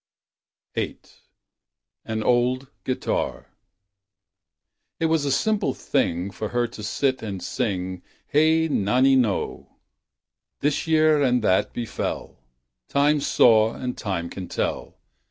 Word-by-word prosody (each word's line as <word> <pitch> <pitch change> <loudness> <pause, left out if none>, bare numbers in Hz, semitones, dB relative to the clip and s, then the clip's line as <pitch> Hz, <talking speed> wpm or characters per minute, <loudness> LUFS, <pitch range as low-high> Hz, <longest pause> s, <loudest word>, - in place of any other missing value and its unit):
VIII. - - -2 1.1
On - - -5
an 110 0 -1
Old 125 +2 +1
Guitar 130 - -2 1.5
It 165 - +1
was 160 -2 +2
a 140 - 0
simple 215 +7 +1
thing 90 +4 -1
For 105 +2 -5
her 120 0 +1
to - - -10
sit 130 +5 0
and 100 -4 -5
sing, 95 -2 -2 0.2
"Hey 160 +2 +3
nonino! 125 -2 +2 0.5
" - - -62
This 145 +3 0
year 155 -2 +4
and 125 -3 +2
that 95 -2 +2
befell, 120 -2 -4 0.5
(Time 145 +1 +3
saw 115 -4 +4
and 125 -1 -4
Time 95 -6 -3
can 90 +1 -7
tell). - - -3
125 Hz, 120 wpm, -24 LUFS, 105-145 Hz, 1.5 s, year